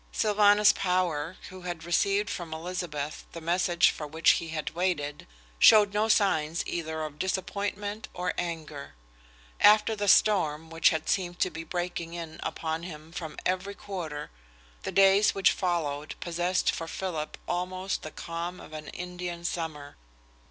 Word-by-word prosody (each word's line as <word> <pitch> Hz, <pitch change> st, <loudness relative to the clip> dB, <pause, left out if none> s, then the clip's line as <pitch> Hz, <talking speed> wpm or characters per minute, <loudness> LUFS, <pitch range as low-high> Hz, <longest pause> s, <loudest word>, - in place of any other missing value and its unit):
Sylvanus 210 Hz, 0 st, +5 dB
Power, 180 Hz, -3 st, 0 dB
who 185 Hz, 0 st, -10 dB
had 175 Hz, -2 st, -5 dB
received 195 Hz, +4 st, +2 dB
from 165 Hz, -3 st, -5 dB
Elizabeth 160 Hz, -3 st, -4 dB
the 170 Hz, -, -6 dB
message 175 Hz, +1 st, +3 dB
for 150 Hz, -, -6 dB
which 160 Hz, +2 st, +4 dB
he 165 Hz, -, -1 dB
had 160 Hz, -1 st, -3 dB
waited, 155 Hz, -, -2 dB, 0.3 s
showed 210 Hz, -2 st, +7 dB
no 210 Hz, +1 st, +2 dB
sign 165 Hz, -7 st, +2 dB
either 160 Hz, -2 st, -3 dB
of 150 Hz, -1 st, -7 dB
disappointment 205 Hz, +3 st, -2 dB
or 180 Hz, -1 st, -2 dB
anger. 155 Hz, -, -5 dB, 0.6 s
After 215 Hz, +1 st, +6 dB
the 205 Hz, -1 st, -2 dB
storm 165 Hz, -7 st, +3 dB
which 165 Hz, -1 st, +4 dB
had 160 Hz, -1 st, -2 dB
seemed 175 Hz, -2 st, 0 dB
to 185 Hz, -, +2 dB
be 165 Hz, -, -6 dB
breaking 175 Hz, -1 st, -4 dB
in 165 Hz, -2 st, -7 dB
upon 160 Hz, 0 st, -3 dB
him 160 Hz, -2 st, -9 dB
from 165 Hz, -3 st, -6 dB
every 185 Hz, +2 st, -1 dB
quarter, 165 Hz, -8 st, -6 dB, 0.5 s
the -, -, -4 dB
days 195 Hz, +1 st, +5 dB
which 195 Hz, -1 st, +4 dB
followed 155 Hz, -5 st, -2 dB
possessed 175 Hz, +1 st, 0 dB
for 165 Hz, -, -5 dB
Philip 165 Hz, -3 st, -4 dB
almost 185 Hz, +2 st, -2 dB
the 155 Hz, -, -6 dB
calm 170 Hz, +3 st, -5 dB
of -, -, -12 dB
an 155 Hz, -1 st, -7 dB
Indian 180 Hz, -1 st, -6 dB
summer. 155 Hz, -, -4 dB
175 Hz, 150 wpm, -28 LUFS, 160-190 Hz, 0.6 s, showed